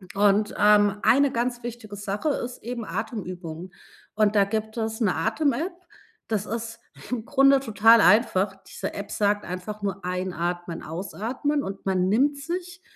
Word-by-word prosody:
Und, 205 Hz, +1 st, +3 dB
ähm, 205 Hz, 0 st, +5 dB
eine 280 Hz, +1 st, +4 dB
ganz 240 Hz, 0 st, -2 dB
wichtige 235 Hz, -3 st, -7 dB
Sache 205 Hz, +9 st, -2 dB
ist 250 Hz, -3 st, -4 dB
eben 235 Hz, -1 st, -5 dB
Atemübungen. 185 Hz, -5 st, -6 dB, 0.4 s
Und 215 Hz, 0 st, +2 dB
da 200 Hz, -, +6 dB
gibt 220 Hz, +2 st, -3 dB
es 220 Hz, 0 st, -3 dB
'ne 205 Hz, -5 st, +2 dB
Atem 275 Hz, +5 st, +1 dB
App, 340 Hz, +8 st, -3 dB, 0.5 s
das 215 Hz, -2 st, -1 dB
ist 230 Hz, +1 st, -5 dB, 0.3 s
im 230 Hz, -3 st, -2 dB
Grunde 275 Hz, 0 st, +5 dB
total 225 Hz, -2 st, +5 dB
einfach. 200 Hz, -3 st, +4 dB
Diese -, -, -5 dB
App 200 Hz, 0 st, -6 dB
sagt 205 Hz, 0 st, +1 dB
einfach 185 Hz, +4 st, -6 dB
nur: 195 Hz, -1 st, -3 dB
„Einatmen, 175 Hz, -2 st, -3 dB
ausatmen“ 230 Hz, -, -3 dB
und 195 Hz, 0 st, -7 dB
man 185 Hz, -1 st, +1 dB
nimmt 275 Hz, +8 st, +3 dB
sich 350 Hz, +4 st, -5 dB
215 Hz, 155 wpm, -25 LUFS, 195-240 Hz, 0.5 s, da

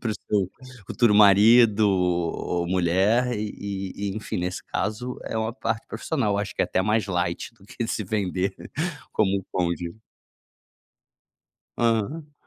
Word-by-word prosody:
para 110 Hz, -3 st, -1 dB
o -, -, -5 dB
seu 100 Hz, -5 st, -1 dB, 0.4 s
futuro 120 Hz, -1 st, +3 dB
marido 105 Hz, +1 st, +6 dB
ou 90 Hz, -1 st, 0 dB
mulher 95 Hz, +8 st, +2 dB
e 100 Hz, -2 st, -4 dB
e 100 Hz, 0 st, -3 dB
enfim 110 Hz, -, -4 dB
nesse 90 Hz, +1 st, -3 dB
caso 125 Hz, +4 st, -3 dB
é -, -, -4 dB
uma 110 Hz, +1 st, -1 dB
parte 115 Hz, -2 st, -3 dB
profissional, 110 Hz, -4 st, -1 dB
acho 105 Hz, 0 st, -3 dB
que -, -, +1 dB
é -, -, +3 dB
até 95 Hz, -, 0 dB
mais 105 Hz, 0 st, +1 dB
light 85 Hz, 0 st, -2 dB
do 100 Hz, -, -21 dB
que 115 Hz, +3 st, -5 dB
se 105 Hz, -, -2 dB
vender 95 Hz, -1 st, -1 dB, 0.6 s
como 100 Hz, -2 st, +2 dB
um 95 Hz, -, -3 dB
coach. 85 Hz, -1 st, -1 dB, 1.8 s
Aham. 120 Hz, +7 st, 0 dB
105 Hz, 145 wpm, -25 LUFS, 95-110 Hz, 1.8 s, marido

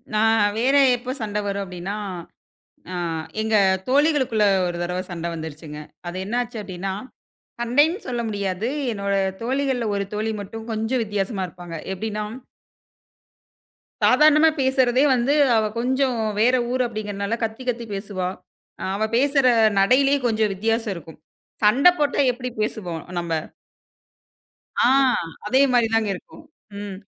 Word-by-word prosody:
நான் 225 Hz, 0 st, +4 dB
வேற 260 Hz, +4 st, +2 dB, 0.2 s
எப்ப 250 Hz, +1 st, -5 dB
சண்டை 210 Hz, -1 st, -2 dB
வரும் 200 Hz, 0 st, -2 dB
அப்படின்னா, 180 Hz, +2 st, -5 dB, 1.0 s
அ -, -, -4 dB, 0.5 s
எங்க 220 Hz, 0 st, -1 dB, 0.3 s
தோழிகளுக்குள்ள 265 Hz, -6 st, +3 dB, 0.2 s
ஒரு 175 Hz, -1 st, -3 dB
தடவை 180 Hz, +1 st, -2 dB
சண்டை 170 Hz, -1 st, -4 dB
வந்துருச்சுங்க. 155 Hz, -1 st, -7 dB, 0.3 s
அது 175 Hz, -, -6 dB
என்ன 235 Hz, +4 st, -2 dB
ஆச்சு 235 Hz, -2 st, -7 dB
அப்படின்னா, 190 Hz, 0 st, -5 dB, 0.7 s
சண்டைன்னு 290 Hz, -, +2 dB
சொல்ல 240 Hz, -1 st, -2 dB
முடியாது, 200 Hz, +1 st, -2 dB, 0.2 s
என்னோட 200 Hz, -1 st, -2 dB, 0.3 s
தோழிகள்ல 260 Hz, -1 st, 0 dB
ஒரு 200 Hz, -, -1 dB
தோழி 215 Hz, +1 st, -1 dB
மட்டும் 220 Hz, +3 st, -8 dB
கொஞ்சம் 225 Hz, +3 st, 0 dB
வித்தியாசமா 200 Hz, -1 st, -2 dB
இருப்பாங்க. 175 Hz, -1 st, -9 dB, 0.2 s
எப்படின்னா 210 Hz, +2 st, -3 dB, 1.8 s
சாதாரணமா 305 Hz, +4 st, +6 dB
பேசுறதே 260 Hz, 0 st, +3 dB
வந்து 255 Hz, +3 st, +2 dB, 0.2 s
அவ 220 Hz, -, +3 dB, 0.2 s
கொஞ்சம் 260 Hz, 0 st, +1 dB, 0.2 s
வேற 250 Hz, +3 st, +4 dB, 0.2 s
ஊரு 255 Hz, 0 st, +1 dB
அப்படிங்கிறதுனால 210 Hz, 0 st, -3 dB
கத்தி 225 Hz, +3 st, -3 dB
கத்தி 235 Hz, -1 st, -2 dB
பேசுவா. 195 Hz, -2 st, -3 dB, 0.7 s
அவ 215 Hz, -, -1 dB
பேசுற 275 Hz, -1 st, +3 dB, 0.3 s
நடையிலயே 270 Hz, +7 st, +4 dB
கொஞ்சம் 215 Hz, -2 st, +1 dB
வித்தியாசம் 225 Hz, +1 st, -1 dB
இருக்கும். 160 Hz, -2 st, -11 dB, 0.4 s
சண்டை 265 Hz, +12 st, +6 dB
போட்டா 290 Hz, -1 st, +1 dB
எப்படி 250 Hz, +1 st, -5 dB
பேசுவோம் 180 Hz, -7 st, -3 dB, 0.2 s
நம்ப 170 Hz, -1 st, -3 dB, 1.4 s
அ -, -, +3 dB, 0.6 s
அதே 260 Hz, +5 st, +4 dB
மாதிரிதாங்க 225 Hz, -3 st, +2 dB
இருக்கும். 310 Hz, -, -13 dB, 0.4 s
ம். 200 Hz, -2 st, -6 dB
220 Hz, 125 wpm, -23 LUFS, 195-255 Hz, 1.8 s, சாதாரணமா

